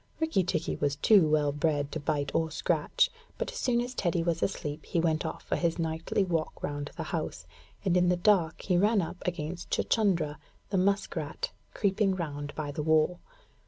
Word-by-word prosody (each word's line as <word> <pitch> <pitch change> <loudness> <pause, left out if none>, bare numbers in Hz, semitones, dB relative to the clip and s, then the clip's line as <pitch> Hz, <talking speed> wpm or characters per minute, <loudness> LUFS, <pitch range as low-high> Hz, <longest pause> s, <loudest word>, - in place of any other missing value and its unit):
Rikki 320 - +2
tikki 165 -2 -1
was 145 -1 0
too 170 +2 +5
well 150 -1 +3
bred 145 -1 0
to 160 - -3
bite 145 -2 -1
or 160 -1 +1
scratch, 155 - +1 0.3
but - - -2
as - - -8
soon 240 -2 +2
as 245 +1 -4
Teddy 175 -6 0
was 165 -1 0
asleep 155 -5 -2
he 170 - 0
went 160 -1 +1
off 160 - -6
for - - -1
his 170 -2 0
nightly 165 +3 0
walk 165 -4 -2
round 145 0 -3
the - - -2
house, - - -4 0.4
and 185 -2 +3
in 180 0 +4
the 180 - +3
dark 175 -4 +2
he 180 -2 +2
ran 205 0 +3
up 180 - -7
against 175 0 -3
Chuchundra, 170 -9 +1 0.3
the 195 - +2
musk 200 +2 +1
rat, - - -3 0.2
creeping 195 -1 +2
round 145 -4 -4
by 150 -2 -3
the 150 - -3
wall. 160 +3 +3
165 Hz, 195 wpm, -29 LUFS, 155-190 Hz, 0.4 s, too